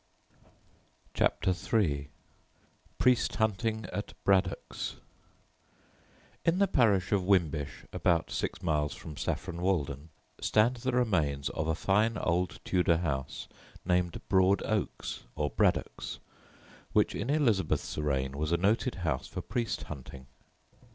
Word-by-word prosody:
CHAPTER 95 Hz, -, +2 dB
III 80 Hz, -8 st, 0 dB, 0.9 s
PRIEST 125 Hz, -2 st, +3 dB
HUNTING 110 Hz, 0 st, 0 dB
AT 105 Hz, -, -4 dB
BRADDOCKS 95 Hz, -2 st, 0 dB, 1.5 s
In 165 Hz, +1 st, +3 dB
the 200 Hz, 0 st, +4 dB
parish 105 Hz, -, +3 dB
of 100 Hz, -3 st, +2 dB
Wimbish, 80 Hz, -7 st, +1 dB
about 85 Hz, -2 st, +1 dB
six -, -, -3 dB
miles 75 Hz, -3 st, 0 dB
from 75 Hz, -, -9 dB
Saffron 85 Hz, +3 st, -3 dB
Walden, 80 Hz, -5 st, -1 dB, 0.3 s
stand 115 Hz, +4 st, +3 dB
the 130 Hz, +2 st, -1 dB
remains 80 Hz, -, +1 dB
of 80 Hz, -, -3 dB
a 80 Hz, -, +1 dB
fine 105 Hz, +5 st, +2 dB
old 90 Hz, 0 st, 0 dB
Tudor 90 Hz, -2 st, +3 dB
house 70 Hz, -6 st, -3 dB, 0.4 s
named 90 Hz, -1 st, +1 dB
Broad 95 Hz, +1 st, +4 dB
Oaks, 110 Hz, -3 st, -2 dB
or 75 Hz, -2 st, -1 dB
Braddocks, -, -, 0 dB, 0.8 s
which -, -, +3 dB
in 115 Hz, -, -3 dB
Elizabeth's 115 Hz, -, +1 dB
reign 70 Hz, -2 st, -1 dB
was 75 Hz, +1 st, -1 dB
a 85 Hz, -, +4 dB
noted 110 Hz, +7 st, +1 dB
house 65 Hz, -5 st, -1 dB
for -, -, -5 dB
priest 120 Hz, -2 st, -2 dB
hunting. 70 Hz, -2 st, -9 dB
90 Hz, 120 wpm, -30 LUFS, 75-110 Hz, 1.5 s, the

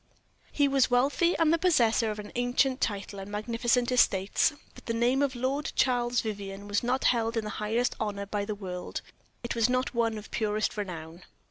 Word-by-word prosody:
He 285 Hz, -1 st, +3 dB
was 270 Hz, -2 st, +3 dB
wealthy, 280 Hz, +8 st, +2 dB
and 330 Hz, -1 st, +3 dB
the 335 Hz, -, +2 dB
possessor 235 Hz, -10 st, +3 dB
of 210 Hz, -, -4 dB
an 210 Hz, 0 st, -8 dB
ancient 250 Hz, +2 st, +1 dB
title 200 Hz, -1 st, -2 dB
and 195 Hz, +1 st, -7 dB
magnificent 235 Hz, +4 st, 0 dB
estates; 200 Hz, +1 st, +3 dB, 0.2 s
but -, -, -15 dB
the 230 Hz, -, -1 dB
name 245 Hz, +4 st, +2 dB
of 275 Hz, -2 st, 0 dB
Lord 265 Hz, +4 st, -1 dB
Charles 245 Hz, -1 st, +2 dB
Vivianne 200 Hz, -2 st, -6 dB
was 205 Hz, 0 st, 0 dB
not 250 Hz, +2 st, 0 dB
held 230 Hz, -1 st, +2 dB
in 220 Hz, -, -1 dB
highest 215 Hz, +4 st, -1 dB
honor 200 Hz, -2 st, -3 dB
by 205 Hz, 0 st, -2 dB
the 210 Hz, +1 st, -4 dB
world 180 Hz, -3 st, -6 dB, 0.4 s
it 240 Hz, -, -2 dB
was 230 Hz, 0 st, +2 dB
not 255 Hz, +1 st, 0 dB
one 230 Hz, -2 st, 0 dB
of 210 Hz, -, -10 dB
purest 215 Hz, -1 st, -1 dB
renown. 170 Hz, -4 st, -6 dB
230 Hz, 190 wpm, -28 LUFS, 210-250 Hz, 0.4 s, He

